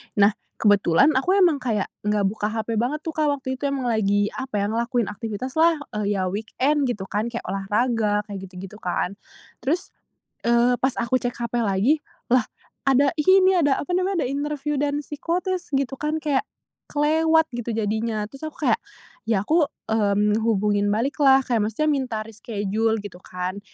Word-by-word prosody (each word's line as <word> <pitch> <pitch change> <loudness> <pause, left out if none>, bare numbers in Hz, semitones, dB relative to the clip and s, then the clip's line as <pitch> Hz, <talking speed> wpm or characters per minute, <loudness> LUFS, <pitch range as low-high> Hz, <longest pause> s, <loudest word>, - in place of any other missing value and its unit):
Nah, 205 +1 +5 0.3
kebetulan, 205 +2 +4
aku 365 +9 +3
emang 350 -5 +5
kayak 230 -8 -1 0.2
nggak 210 0 +1
buka 210 +1 -2
hp 225 +1 -2
banget 245 +7 0
tuh, 320 +1 -6
Kak, 305 -2 +2
waktu 260 -2 -3
itu. 260 - -13
Emang 275 -3 -1
lagi 205 -3 +2
apa 260 -5 -3
ya, 200 - 0
ngelakuin 235 +1 0
aktivitas 225 +4 -5
lah, 325 0 +4 0.2
eee, 205 0 0
ya 185 - 0
weekend 255 +9 0
gitu 210 -6 -3
kan. 215 +4 -2
Kayak 235 - -5
olahraga, 210 +2 +1
kayak 200 -2 -6
gitu-gitu 185 +2 -10
kan. 180 0 -2 0.5
Terus, 315 +7 0 0.6
eee, 235 +1 +4
pas 265 - +2
aku 235 +2 0
cek 245 -1 -2
HP 235 0 -2
lagi, 210 +9 +2 0.3
lah 255 -2 +5 0.4
ada 275 +1 +5
ini 375 +4 +5
ada 290 -6 +3
apa 325 - -4
namanya, 370 -2 +1
ada - - -1
interviu 295 +1 -2
dan 290 0 0
psikotes, 350 +4 -3
gitu 270 0 0
kan, 305 +1 -1
kayak 295 0 0 0.5
kelewat 320 +2 +3
gitu 240 -1 -3
jadinya. 220 0 -1
Terus 275 +7 -8
aku - - -3
kayak, - - +3 0.5
ya 220 -4 +2
aku, 325 +1 +4 0.3
mmm, 210 0 +2
hubungin 205 -2 +2
balik 240 +9 -1
lah, 270 -1 +7
kayak 230 -4 +1
maksudnya 305 +8 -1
minta 260 -6 -1
reschedule 220 0 -2
gitu 185 -3 -9
kan, 180 +2 -4
235 Hz, 170 wpm, -23 LUFS, 210-290 Hz, 0.6 s, lah